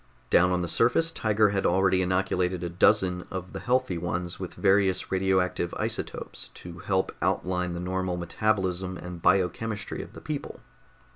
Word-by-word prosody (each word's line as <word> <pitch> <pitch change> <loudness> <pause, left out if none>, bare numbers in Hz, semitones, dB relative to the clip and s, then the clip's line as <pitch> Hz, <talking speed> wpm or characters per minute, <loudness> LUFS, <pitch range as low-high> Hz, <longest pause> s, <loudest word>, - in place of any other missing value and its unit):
Down 90 +1 +5
on 90 -1 +1
the 85 - -2
surface 125 - +2
Tiger 110 -7 +2
had 100 -1 0
already 95 +1 +3
inoculated 90 -1 0
a 85 - -2
dozen 90 0 +2
of 95 -1 -6
the - - -4
healthy 125 -8 0
ones 90 +1 -3
with 95 -2 -6
various 95 -2 +2
radioactive 95 -2 +1
isotopes - - -4
to 85 -1 -10
help 95 +1 0
outline 90 -1 0
the 85 - -4
normal 90 0 -2
metabolism 95 0 -1
and 90 -1 -8
biochemistry 100 +4 0
of - - -11
the - - -10
people. 155 -3 -5
95 Hz, 155 wpm, -27 LUFS, 90-100 Hz, -, Down